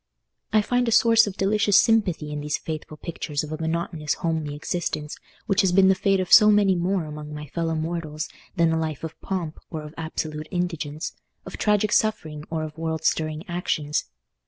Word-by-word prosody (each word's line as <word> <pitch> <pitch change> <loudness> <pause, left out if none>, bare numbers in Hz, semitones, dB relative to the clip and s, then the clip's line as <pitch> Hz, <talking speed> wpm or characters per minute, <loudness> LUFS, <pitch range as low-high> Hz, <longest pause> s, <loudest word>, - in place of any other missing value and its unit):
I 215 -1 +4
find 245 +2 +1
a - - +1
source 230 0 +6
of 195 - -5
delicious 205 0 +4
sympathy 185 -9 +2
in 150 0 -4
these 150 0 -1
faithful 155 -1 -6
pictures 150 -2 -4
of 155 - -7
a 155 - -3
monotonous 160 -1 -1
homely 160 -4 -2
existence, 155 -1 -3 0.3
which 200 +1 +3
has 190 -3 +2
been 190 +1 +5
the - - +6
fate 195 +1 +1
of 185 - 0
so 215 -1 +9
many 205 -2 +5
more 180 0 0
among 150 0 -7
my 150 0 -6
fellow 165 +2 -2
mortals 155 -1 -3 0.3
than 170 -3 +3
a 160 - +1
life 155 -3 -3
of 160 0 -7
pomp 175 -5 -4
or 155 -2 -5
of 150 0 -10
absolute 155 -1 -4
indigence, 165 -4 -3 0.3
of - - -7
tragic 210 0 +2
suffering 155 -8 0
or 160 -1 -2
of 155 +1 -7
world 160 -1 -2
stirring 155 0 0
actions. 160 -4 -1
165 Hz, 190 wpm, -24 LUFS, 155-190 Hz, 0.3 s, so